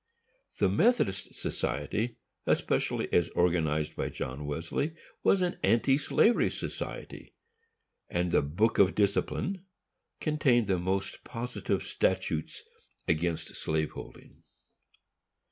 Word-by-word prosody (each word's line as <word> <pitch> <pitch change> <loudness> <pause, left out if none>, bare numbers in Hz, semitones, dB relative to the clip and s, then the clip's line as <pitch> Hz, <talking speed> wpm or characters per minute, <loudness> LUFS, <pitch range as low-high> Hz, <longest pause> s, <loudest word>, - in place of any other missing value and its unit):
The - - +3
Methodist 230 - +2
Society 115 +3 -2 0.3
especially, - - +1
as 85 -1 +3
organized 80 -3 +1
by - - -2
John 70 +3 -5
Wesley, 85 - -2 0.3
was 190 -2 +4
an 175 - -1
anti 120 +7 +3
slavery 220 - +3
society, - - -6 0.7
and 90 0 0
the - - +4
Book 95 +11 +1
of 95 -1 +5
Discipline 110 - 0 0.6
contained 135 -7 +3
the 95 -3 +1
most 95 +2 -2
positive 120 +1 -3
statutes 80 -1 -1 0.4
against 80 0 0
slave 80 -1 -1
holding. - - -11
95 Hz, 105 wpm, -30 LUFS, 80-125 Hz, 0.7 s, of